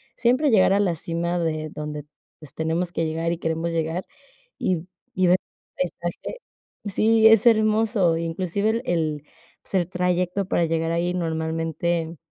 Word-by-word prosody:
siempre 255 Hz, +5 st, +2 dB
llegar 195 Hz, -2 st, +5 dB
a 200 Hz, -, +3 dB
la 175 Hz, -4 st, +1 dB
cima 170 Hz, +2 st, -2 dB
de 155 Hz, -2 st, -2 dB
donde, 150 Hz, -1 st, -6 dB, 0.3 s
pues, 150 Hz, -3 st, -12 dB
tenemos 165 Hz, +2 st, -1 dB
que 165 Hz, -1 st, -1 dB
llegar 165 Hz, +1 st, -1 dB
y 170 Hz, -, -2 dB
queremos 165 Hz, 0 st, -1 dB
llegar, 165 Hz, +2 st, -1 dB, 0.6 s
y 180 Hz, -2 st, -1 dB, 0.3 s
y 185 Hz, -1 st, +3 dB
ver 180 Hz, +1 st, +5 dB, 0.4 s
el 180 Hz, -1 st, +1 dB
paisaje 175 Hz, -, -5 dB, 0.5 s
Sí, 220 Hz, +3 st, +4 dB
es 225 Hz, +1 st, +6 dB
hermoso, 215 Hz, -6 st, +3 dB
inclusive 180 Hz, +5 st, -1 dB
el 230 Hz, +1 st, -1 dB
el, 155 Hz, -4 st, -1 dB, 0.4 s
pues, 180 Hz, -3 st, 0 dB
trayecto 180 Hz, +1 st, 0 dB
para 170 Hz, -, +2 dB
llegar 165 Hz, 0 st, -1 dB
ahí 175 Hz, +1 st, 0 dB
normalmente, 165 Hz, 0 st, -2 dB
170 Hz, 150 wpm, -24 LUFS, 165-190 Hz, 0.6 s, es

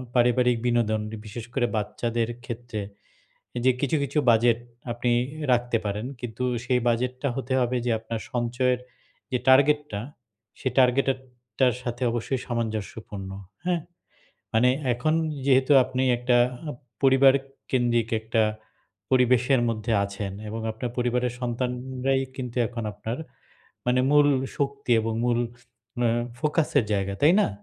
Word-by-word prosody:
পারিবারিক 125 Hz, 0 st, +4 dB
বিনোদন 115 Hz, -3 st, +2 dB
ই -, -, -7 dB
বিশেষ 110 Hz, +2 st, -7 dB
করে 125 Hz, -, +2 dB
বাচ্চাদের 115 Hz, +2 st, -1 dB, 0.2 s
ক্ষেত্রে 120 Hz, -2 st, -5 dB, 0.8 s
এ -, -, +1 dB
যে -, -, +7 dB
কিছু, 140 Hz, +2 st, +1 dB
কিছু 140 Hz, +2 st, -1 dB
বাজেট 115 Hz, 0 st, +4 dB, 0.3 s
আপনি 120 Hz, +1 st, -1 dB, 0.3 s
এ -, -, -2 dB
রাখতে 120 Hz, -1 st, +2 dB
পারেন। 105 Hz, +3 st, -2 dB
কিন্তু 120 Hz, 0 st, -5 dB, 0.2 s
সেই 125 Hz, -1 st, +2 dB
বাজেটটা 125 Hz, +3 st, 0 dB
হতে 130 Hz, -1 st, -3 dB
হবে 125 Hz, 0 st, +1 dB
যে -, -, +2 dB
আপনার 115 Hz, 0 st, -5 dB
সঞ্চয়ের 125 Hz, +1 st, 0 dB, 0.5 s
যে 125 Hz, -, +2 dB
টার্গেট 140 Hz, +3 st, +6 dB
টা, 100 Hz, -, -2 dB, 0.6 s
সেই 130 Hz, -, -1 dB
টার্গেটে 130 Hz, +1 st, +4 dB, 0.5 s
টার 130 Hz, -2 st, +4 dB
সাথে 120 Hz, 0 st, -4 dB
অবশ্যই 120 Hz, +2 st, -2 dB
সামঞ্জস্যপূর্ণ। 110 Hz, -4 st, -4 dB, 0.3 s
হ্যাঁ? 175 Hz, -1 st, +1 dB, 0.7 s
মানে 120 Hz, +3 st, +5 dB, 0.2 s
এখন 140 Hz, +6 st, 0 dB, 0.3 s
যেহেতু 135 Hz, 0 st, +4 dB
আপনি 130 Hz, +1 st, -2 dB
একটা 125 Hz, 0 st, +2 dB, 0.3 s
আ -, -, -2 dB, 0.3 s
পরিবার 135 Hz, 0 st, +6 dB, 0.4 s
কেন্দ্রিক 120 Hz, -3 st, +2 dB
একটা 110 Hz, 0 st, +1 dB, 0.7 s
পরিবেশের 125 Hz, 0 st, +4 dB
মধ্যে 115 Hz, +1 st, -2 dB
আছেন 100 Hz, 0 st, -4 dB, 0.2 s
এবং 110 Hz, +1 st, -4 dB
আপনার 115 Hz, +3 st, -4 dB
পরিবারের 125 Hz, 0 st, 0 dB
সন্তানরাই 125 Hz, +2 st, -1 dB
কিন্তু 125 Hz, -2 st, -5 dB
এখন 120 Hz, -1 st, -5 dB
আপনার 110 Hz, +4 st, -5 dB, 0.7 s
মানে 125 Hz, +1 st, +3 dB
মূল 145 Hz, 0 st, +6 dB, 0.3 s
শক্তি 140 Hz, -2 st, -2 dB
এবং 110 Hz, +1 st, -2 dB
মূল 120 Hz, -1 st, +2 dB, 0.7 s
আ -, -, +4 dB, 0.3 s
ফোকাসের 150 Hz, -2 st, +1 dB
জায়গা, 100 Hz, -1 st, 0 dB
তাই 150 Hz, +4 st, +6 dB
না? -, -, +3 dB
125 Hz, 135 wpm, -26 LUFS, 115-130 Hz, 0.8 s, যে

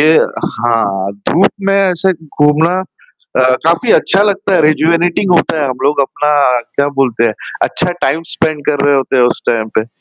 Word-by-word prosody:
ये 155 Hz, +2 st, +5 dB, 0.5 s
हाँ, 100 Hz, -5 st, -1 dB, 0.2 s
धूप 190 Hz, +4 st, +3 dB, 0.2 s
में 195 Hz, -, +2 dB
ऐसे 190 Hz, -1 st, +1 dB, 0.3 s
घूमना 160 Hz, +5 st, +2 dB, 0.6 s
अ, -, -, +4 dB, 0.2 s
काफ़ी 170 Hz, +8 st, +2 dB
अच्छा 195 Hz, +2 st, +3 dB
लगता 200 Hz, -1 st, -1 dB
है -, -, +3 dB
रेजुवेटिंग 170 Hz, +4 st, +1 dB
होता 160 Hz, -2 st, 0 dB
है, -, -, 0 dB
हम 130 Hz, -, -3 dB
लोग 145 Hz, 0 st, +1 dB
अपना 150 Hz, +2 st, -1 dB, 0.4 s
क्या 140 Hz, 0 st, +1 dB
बोलते 120 Hz, -3 st, 0 dB
हैं 110 Hz, -, 0 dB, 0.3 s
अच्छा 180 Hz, +1 st, -1 dB
टाइम 165 Hz, -, 0 dB
स्पेंड 155 Hz, -3 st, -2 dB
कर 145 Hz, -1 st, 0 dB
रहे 145 Hz, 0 st, +3 dB
होते 135 Hz, 0 st, 0 dB
हैं 125 Hz, -, +4 dB
उस 120 Hz, -, 0 dB
टाइम 110 Hz, -2 st, -1 dB
पे। 110 Hz, -, -5 dB
150 Hz, 180 wpm, -13 LUFS, 130-175 Hz, 0.6 s, ये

